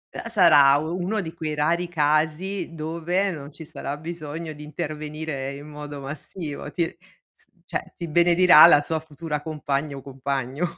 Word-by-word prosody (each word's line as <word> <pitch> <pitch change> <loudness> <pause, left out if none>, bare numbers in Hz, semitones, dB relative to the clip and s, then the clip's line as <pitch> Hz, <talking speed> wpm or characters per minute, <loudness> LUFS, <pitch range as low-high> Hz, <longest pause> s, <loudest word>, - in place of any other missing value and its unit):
Uhm, 230 - -5
sarà 150 -10 +6
u 160 +4 -3
uno 210 +4 -1
di 165 -3 -7
quei 155 -3 -4
rari 170 +4 +1
casi 155 +4 0
dove 170 +5 -1
non 145 -4 -8
ci 160 +2 -10
sarà 145 -1 -5
bisogno 160 0 -6
di 150 0 -11
intervenire 150 -2 -5
in 145 +2 -10
modo 145 -1 -8
massivo. 145 +2 -6
Ti 165 0 -2 0.4
s - - -27 0.2
cioè - - -5
ti 170 - -6
benedirà 170 0 +7
la 145 - +7
sua 160 +2 -1
futura 155 -1 -5
compagna 150 -2 -3
o - - -8
compagno. 135 +4 -3
155 Hz, 160 wpm, -24 LUFS, 145-170 Hz, 0.4 s, benedirà